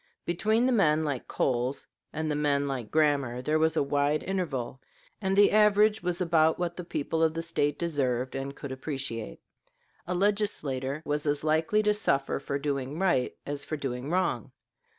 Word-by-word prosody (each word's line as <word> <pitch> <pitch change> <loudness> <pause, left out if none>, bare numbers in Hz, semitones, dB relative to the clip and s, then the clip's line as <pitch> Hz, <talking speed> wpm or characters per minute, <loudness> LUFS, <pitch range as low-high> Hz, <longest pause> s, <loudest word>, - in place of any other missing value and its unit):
Between 215 +7 +1
the 260 - +3
men 160 -9 +3
like 145 -5 -3
Coles 125 +1 -1 0.3
and 155 0 -2
the - - 0
men 145 -1 +1
like 125 -5 -4
Grammar 145 -6 +1
there 155 +3 +1
was 160 0 +2
a - - +3
wide 145 +2 +1
interval, 140 -10 -3 0.4
and 190 -1 0
the 205 0 +6
average 210 0 +4
was 175 0 -2
about 160 -3 +3
what 175 -1 -2
the 180 - -6
people 160 -1 -2
of 160 0 +2
the 165 - -2
State 145 -3 0
deserved 130 -7 -1
and 135 +1 -4
could 140 - -7
appreciate. 130 -4 -4 0.7
A 180 - -1
legislator 155 -9 0
was 150 +1 -2
as 145 0 0
likely 160 +7 +2
to 210 0 +3
suffer 140 -10 0
for 140 - -3
doing 140 0 -3
right 175 -9 +1
as 145 0 -4
for 155 - -4
doing 130 -1 -4
wrong. 185 +2 0
150 Hz, 175 wpm, -28 LUFS, 140-175 Hz, 0.7 s, the